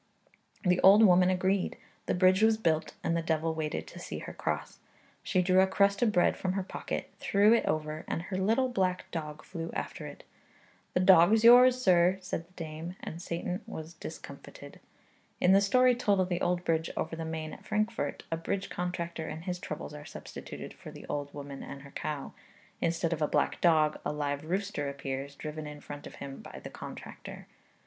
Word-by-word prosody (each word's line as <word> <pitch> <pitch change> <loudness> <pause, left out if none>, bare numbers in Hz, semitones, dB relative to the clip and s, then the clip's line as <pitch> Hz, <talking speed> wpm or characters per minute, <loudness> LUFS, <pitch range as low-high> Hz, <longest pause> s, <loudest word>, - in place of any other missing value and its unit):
The 180 0 +3
old 200 +3 +8
woman 180 -2 +6
agreed; 185 +1 +1 0.3
the - - +1
bridge 185 +2 +4
was 220 0 +5
built; 160 -7 0
and 165 - +1
the 170 - +1
devil 160 0 0
waited 150 - -3
to - - -11
see - - -6
her - - -7
cross. - - -3 0.4
She 185 - +1
drew 185 +1 +4
a 190 - +4
crust 200 +1 +2
of 235 -3 +4
bread 180 -3 +3
from 185 -1 -2
her 195 0 -1
pocket, - - -5
threw 205 +2 +4
it 235 - +2
over, 155 0 -2
and 165 - -2
her 185 +1 -4
little 225 +7 +2
black 185 -7 0
dog 155 -2 -5
flew 165 -2 -6
after - - -4
it. - - -11 0.7
'The 180 - +3
dog's 190 +4 +6
yours, 250 +2 +8
sir,' 185 -4 +4
said 180 -3 -5
the 185 - -27
dame; 165 +1 -6
and 165 - -6
Satan 180 +3 -3
was 160 -6 -7
discomfited. - - -10 0.6
In 180 - +4
the 195 +1 +6
story 250 +5 +5
told 205 -5 +1
of 185 -1 +1
the 175 0 -1
old 180 0 0
bridge 160 0 +1
over 160 +1 -2
the 165 - -5
Main 160 -1 -4
at - - -11
Frankfort, 215 -8 -1
a 165 - 0
bridge 190 +4 -3
contractor 170 -2 -3
and 160 +2 -6
his 180 -1 -3
troubles 150 -3 -6
are 150 0 -8
substituted - - -9
for - - -11
the - - -11
old 145 -1 -3
woman 140 -1 -8
and 140 0 -8
her 140 - -13
cow; 150 -3 -4 0.5
instead 165 0 0
of 160 - -5
a 150 - +3
black - - 0
dog 155 -3 +4
a - - -1
live 145 0 -2
rooster 185 -4 -2
appears, 140 0 -5
driven 155 +1 -6
in 150 0 -8
front 145 0 -9
of - - -12
him 135 -1 -8
by - - -10
the - - -7
contractor. - - -9
175 Hz, 200 wpm, -30 LUFS, 155-190 Hz, 0.7 s, old